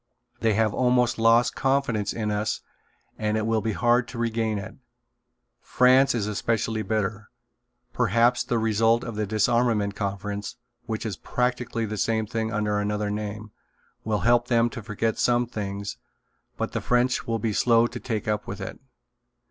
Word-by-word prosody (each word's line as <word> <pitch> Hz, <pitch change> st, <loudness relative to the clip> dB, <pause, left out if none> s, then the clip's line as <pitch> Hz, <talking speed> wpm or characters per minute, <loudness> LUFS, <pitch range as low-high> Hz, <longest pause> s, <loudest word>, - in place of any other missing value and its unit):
They 110 Hz, -2 st, +2 dB
have 110 Hz, -1 st, +2 dB
almost 125 Hz, -2 st, +2 dB
lost 115 Hz, +2 st, +4 dB
confidence 135 Hz, -7 st, 0 dB
in 110 Hz, -2 st, -2 dB
us 105 Hz, +1 st, -1 dB, 0.6 s
and 105 Hz, 0 st, 0 dB
it 110 Hz, -, -1 dB
will 110 Hz, -1 st, +1 dB
be 110 Hz, 0 st, -1 dB
hard 120 Hz, +2 st, +2 dB
to 125 Hz, -, -9 dB
regain 115 Hz, -2 st, 0 dB
it. 100 Hz, -, -6 dB, 0.9 s
France 130 Hz, +1 st, +4 dB
is 110 Hz, -4 st, 0 dB
especially 110 Hz, +1 st, -1 dB
bitter. 105 Hz, -1 st, -2 dB, 0.6 s
Perhaps 120 Hz, +1 st, +3 dB
the 120 Hz, -, 0 dB
result 115 Hz, +1 st, +2 dB
of 115 Hz, -, -5 dB
the 105 Hz, -1 st, -2 dB
Disarmament 110 Hz, 0 st, +1 dB
Conference, 100 Hz, +1 st, -4 dB, 0.3 s
which 110 Hz, 0 st, -3 dB
is 105 Hz, -4 st, -3 dB
practically 125 Hz, -2 st, -1 dB
the 110 Hz, 0 st, -4 dB
same 110 Hz, +2 st, 0 dB
thing 110 Hz, 0 st, -3 dB
under 105 Hz, -1 st, 0 dB
another 105 Hz, 0 st, -1 dB
name, 105 Hz, 0 st, -5 dB, 0.5 s
will 105 Hz, -1 st, -1 dB
help 120 Hz, 0 st, +3 dB
them 120 Hz, -1 st, +2 dB
to 115 Hz, -, -6 dB
forget 110 Hz, +1 st, -2 dB
some 120 Hz, 0 st, +3 dB
things, 100 Hz, -3 st, -5 dB, 0.6 s
but -, -, -2 dB
the -, -, -3 dB
French 125 Hz, +1 st, +1 dB
will 115 Hz, 0 st, 0 dB
be 110 Hz, 0 st, -1 dB
slow 115 Hz, +1 st, +4 dB
to -, -, -5 dB
take 110 Hz, -4 st, -3 dB
up 105 Hz, -1 st, -1 dB
with 100 Hz, +1 st, -5 dB
it. 95 Hz, -, -6 dB
110 Hz, 165 wpm, -25 LUFS, 105-120 Hz, 0.9 s, lost